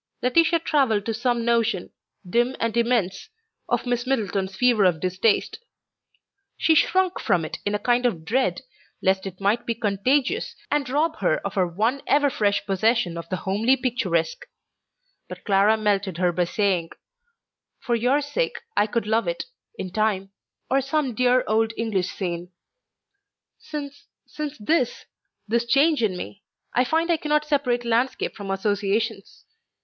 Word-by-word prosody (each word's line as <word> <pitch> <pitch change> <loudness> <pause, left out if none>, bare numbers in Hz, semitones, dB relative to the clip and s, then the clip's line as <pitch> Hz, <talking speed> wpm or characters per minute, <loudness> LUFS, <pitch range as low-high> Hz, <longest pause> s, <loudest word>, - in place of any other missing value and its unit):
Laetitia 330 +7 +4
travelled 270 -11 +1
to 225 - -1
some 240 +1 0
notion, 230 -5 +1 0.4
dim 240 +7 +1
and 230 -1 -1
immense, 235 - 0 0.4
of - - 0
Miss 245 0 -1
Middleton's 200 -7 -1
fever 240 -2 +3
of 180 -4 +3
distaste. 185 +5 0 1.0
She 325 - +3
shrunk 370 +4 +2
from 170 -3 +1
it - - -6
in 205 - 0
a - - +2
kind 245 +4 +2
of 165 -9 -4
dread 255 +8 0 0.4
lest 190 +1 +1
it 185 -1 -9
might 205 +4 0
be 235 - 0
contagious 255 - 0 0.2
and 290 -3 0
rob 315 +4 0
her - - +1
of 200 - -3
her 185 -2 +1
one 220 +10 0
ever 285 -1 +3
fresh 205 -4 0
possession 200 -2 +1
of 170 0 -7
the 185 - -1
homely 215 +8 +1
picturesque; 250 - -1 0.8
but - - -9
Clara 205 +2 +3
melted 200 -4 0
her 180 0 +2
by 175 +1 0
saying, 180 -3 0 0.9
"For 240 - -3
your 250 +5 +2
sake 385 - -2 0.2
I 210 - +3
could 230 0 -1
love 220 -2 +1
it... 170 0 -2 0.3
in 185 - -5
time; 195 -2 0 0.4
or 270 +1 +2
some 275 -1 -1
dear 250 +2 +3
old 220 +1 +1
English 200 -5 -1
scene. 175 -2 -4 1.1
Since... 285 -2 -8 0.2
since 300 -1 -6
this... 250 +3 0 0.4
this 235 +2 +1
change 285 +3 +3
in 200 -5 0
me, 200 +2 -8 0.3
I 250 - +3
find 325 +5 +1
I 335 - +3
cannot 300 0 0
separate 265 -5 0
landscape 240 +3 0
from 200 -2 -7
associations. 205 +2 -2
230 Hz, 155 wpm, -24 LUFS, 195-265 Hz, 1.1 s, Laetitia